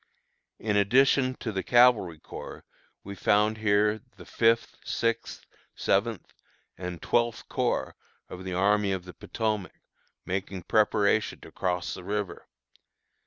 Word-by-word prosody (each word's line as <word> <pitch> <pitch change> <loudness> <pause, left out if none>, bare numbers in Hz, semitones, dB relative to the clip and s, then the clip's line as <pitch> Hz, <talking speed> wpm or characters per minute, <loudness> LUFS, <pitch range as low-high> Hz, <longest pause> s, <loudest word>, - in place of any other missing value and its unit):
In 105 -1 -1
addition 130 +5 +4
to 110 - -2
the 95 -2 -2
Cavalry 120 -9 +4
Corps - - -10 0.4
we 100 - -7
found 105 +3 +2
here 105 0 +2 0.2
the - - -12
Fifth, 115 0 +2
Sixth, 115 0 -2 0.3
Seventh, 105 +1 0 0.4
and 90 -1 -6
Twelfth 120 -1 0
Corps - - -1 0.3
of 90 - -9
the 95 -1 -4
Army 100 +1 +2
of 95 -2 -4
the 90 - -10
Potomac, 110 -4 -3 0.5
making 95 0 -4
preparation 105 0 +2
to - - -12
cross 90 -1 -2
the 90 - -8
river. 105 0 -4
105 Hz, 125 wpm, -27 LUFS, 95-115 Hz, 0.5 s, addition